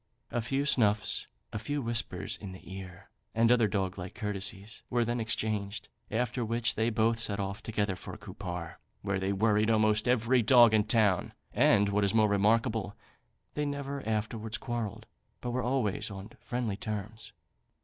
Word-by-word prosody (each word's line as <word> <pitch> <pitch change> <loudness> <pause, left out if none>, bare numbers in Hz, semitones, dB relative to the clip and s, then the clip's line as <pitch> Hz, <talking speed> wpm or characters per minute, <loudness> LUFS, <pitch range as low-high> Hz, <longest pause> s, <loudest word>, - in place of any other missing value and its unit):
A 120 - 0
few 135 +5 -1
snuffs, 110 -7 +2 0.3
a 105 - -2
few 145 +7 -2
whispers 115 -3 -2
in 100 -3 -8
the 95 0 -11
ear, 95 0 -10 0.2
and 115 +1 +4
other 120 -3 +5
dog 95 -1 -2
like 90 0 -7
courtesies, 100 0 -4
were 120 -1 +2
then 120 +1 -1
exchanged; 110 -3 -2 0.2
after 120 +2 -1
which 115 +1 0
they 110 +1 +1
both 115 +1 +2
set 100 -3 +2
off 100 +1 -3
together 105 -3 -1
for - - -8
Cupar, 90 -4 -7 0.2
where 100 -1 0
they 95 +1 0
worried 105 +2 +2
almost 110 -1 +3
every 125 +1 +3
dog 120 0 +7
in 110 - +5
the - - -6
town; 105 -5 +3 0.2
and, 100 0 +4
what 100 +1 +1
is 100 +2 +2
more 110 -1 +5
remarkable, 105 +1 +2 0.6
they 150 - -1
never 140 -1 -3
afterwards 110 0 -2
quarrelled, 115 -2 -4 0.3
but 120 - -4
were 130 +1 0
always 125 -5 0
on 100 +2 -8
friendly 120 -5 -3
terms." 110 +1 -5
110 Hz, 170 wpm, -30 LUFS, 100-120 Hz, 0.6 s, dog